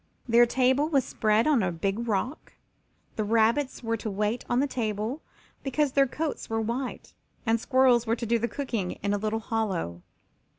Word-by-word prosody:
Their 240 Hz, 0 st, +6 dB
table 260 Hz, +5 st, +2 dB
was 275 Hz, -5 st, +2 dB
spread 215 Hz, -3 st, +2 dB
on 295 Hz, -6 st, +3 dB
a 185 Hz, -2 st, 0 dB
big 195 Hz, +7 st, -2 dB
rock; 225 Hz, -, -2 dB, 0.6 s
the 215 Hz, -, +1 dB
rabbits 230 Hz, +6 st, +1 dB
were 230 Hz, 0 st, -1 dB
to 220 Hz, -, -4 dB
wait 210 Hz, +4 st, -1 dB
on 240 Hz, -, +2 dB
the 280 Hz, -, +3 dB
table 225 Hz, +1 st, -3 dB, 0.4 s
because 280 Hz, +1 st, 0 dB
their 275 Hz, 0 st, +4 dB
coats 305 Hz, +4 st, -4 dB
were 225 Hz, 0 st, 0 dB
white, 240 Hz, +4 st, -4 dB, 0.3 s
and 225 Hz, 0 st, +2 dB
squirrels 255 Hz, -2 st, +3 dB
were 225 Hz, -, +2 dB
to 235 Hz, -, -5 dB
do 230 Hz, +1 st, +2 dB
the 235 Hz, -, 0 dB
cooking 235 Hz, -9 st, -3 dB
in 200 Hz, 0 st, +1 dB
a 205 Hz, -, 0 dB
little 215 Hz, +1 st, -1 dB
hollow. 190 Hz, -, -2 dB
230 Hz, 180 wpm, -27 LUFS, 215-260 Hz, 0.6 s, Their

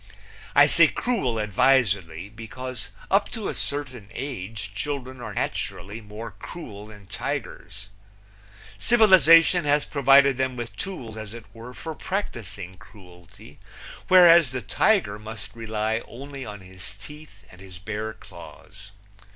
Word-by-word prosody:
I -, -, +8 dB
say -, -, +6 dB
cruel 195 Hz, -, -1 dB
advisedly, 100 Hz, -6 st, +2 dB
because 115 Hz, +2 st, -8 dB, 0.2 s
up 200 Hz, +1 st, +3 dB
to 220 Hz, -4 st, -3 dB
a -, -, -3 dB
certain 130 Hz, -7 st, -3 dB
age 110 Hz, -6 st, -5 dB
children 130 Hz, +2 st, -5 dB
are -, -, -7 dB
naturally 100 Hz, +6 st, -4 dB
more 105 Hz, +2 st, -8 dB
cruel 105 Hz, -, -9 dB
than 105 Hz, -2 st, -14 dB
tigers. 100 Hz, +2 st, -6 dB, 0.9 s
Civilization 185 Hz, -7 st, +6 dB
has 145 Hz, 0 st, +2 dB
provided 140 Hz, -1 st, +5 dB
them 130 Hz, -1 st, -1 dB
with 120 Hz, -4 st, -6 dB
tools, 120 Hz, -, -6 dB
as 110 Hz, 0 st, -8 dB
it 115 Hz, -2 st, -10 dB
were, 115 Hz, +2 st, -10 dB
for 160 Hz, -, -6 dB
practicing 105 Hz, -, -5 dB
cruelty, 90 Hz, -4 st, -16 dB, 0.5 s
whereas 170 Hz, -5 st, +7 dB
the 130 Hz, 0 st, -4 dB
tiger 105 Hz, -, +2 dB
must 105 Hz, -1 st, -9 dB
rely 110 Hz, 0 st, -2 dB
only 135 Hz, +1 st, -8 dB
on 105 Hz, -1 st, -8 dB
his 95 Hz, +2 st, -10 dB
teeth 150 Hz, -5 st, -13 dB
and 90 Hz, -, -15 dB
his 95 Hz, -2 st, -11 dB
bare 110 Hz, +3 st, -5 dB
claws. 100 Hz, -2 st, -14 dB
115 Hz, 130 wpm, -25 LUFS, 100-140 Hz, 0.9 s, I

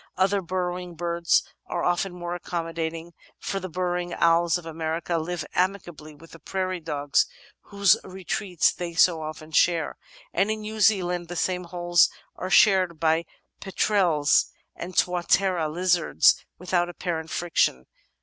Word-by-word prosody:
Other 195 Hz, +2 st, +2 dB
burrowing 180 Hz, -1 st, -4 dB
birds 170 Hz, 0 st, +1 dB, 0.2 s
are -, -, -3 dB
often 180 Hz, +2 st, 0 dB
more 175 Hz, -1 st, -5 dB
ac 175 Hz, -, -8 dB
commodating, 165 Hz, -1 st, -4 dB, 0.3 s
for 195 Hz, -, -3 dB
the 185 Hz, 0 st, -6 dB
Burrowing 175 Hz, 0 st, -2 dB
Owls 170 Hz, +1 st, +3 dB
of 175 Hz, -, -11 dB
America 165 Hz, +1 st, -2 dB
live 165 Hz, -1 st, -4 dB
amicably 175 Hz, -5 st, -2 dB
with 165 Hz, +3 st, -16 dB
the 165 Hz, -, -13 dB
Prairie 185 Hz, +2 st, -3 dB
Dogs 145 Hz, -3 st, 0 dB, 0.4 s
whose 200 Hz, -2 st, +4 dB
retreats 185 Hz, -1 st, -1 dB
they 170 Hz, -1 st, -6 dB
so 165 Hz, -1 st, +4 dB
often 155 Hz, 0 st, -8 dB
share, 165 Hz, 0 st, +2 dB, 0.3 s
and 195 Hz, +4 st, +1 dB
in 215 Hz, 0 st, -2 dB
New 215 Hz, +1 st, -6 dB
Zealand 180 Hz, -5 st, +2 dB
the 175 Hz, -, -7 dB
same 180 Hz, +1 st, -1 dB
holes 175 Hz, -1 st, +3 dB, 0.3 s
are 185 Hz, -, -5 dB
shared 185 Hz, -4 st, +4 dB
by 160 Hz, +1 st, +2 dB, 0.3 s
Petrels 185 Hz, -7 st, +2 dB, 0.3 s
and 180 Hz, +1 st, -8 dB
Tuatera 180 Hz, -1 st, +2 dB
Lizards 175 Hz, +1 st, +3 dB
without 175 Hz, -1 st, 0 dB
apparent 165 Hz, -2 st, -4 dB
friction. 160 Hz, -, 0 dB
175 Hz, 140 wpm, -25 LUFS, 165-185 Hz, 0.4 s, whose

